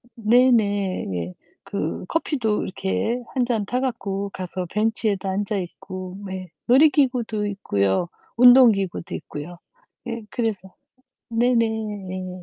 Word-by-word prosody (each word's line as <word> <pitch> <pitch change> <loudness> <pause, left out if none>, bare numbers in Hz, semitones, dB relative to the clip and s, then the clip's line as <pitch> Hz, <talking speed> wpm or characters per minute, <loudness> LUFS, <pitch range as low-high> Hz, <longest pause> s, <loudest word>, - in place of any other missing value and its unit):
네네 215 -4 +3 0.2
예. 90 +2 -7 0.3
그 - - -3
커피도 255 -10 0
이렇게 95 - -1
1 255 -3 +1
잔 225 -4 0
타 250 +5 -1
갖고 200 -6 -2
가서 185 0 -4
벤치에도 210 -2 0
앉아 200 +2 -1
있고. 185 +1 -6
네. 185 -2 -6 0.2
놀이기구도 250 -6 +3
있고요. 100 - 0 0.3
운동 250 0 +9
기구도 195 -4 -3
있고요. 160 +4 -7 0.5
예 230 -1 -4
그래서 200 -6 -3 0.6
네네네. 215 -6 -1
205 Hz, 230 characters per minute, -23 LUFS, 185-235 Hz, 0.6 s, 운동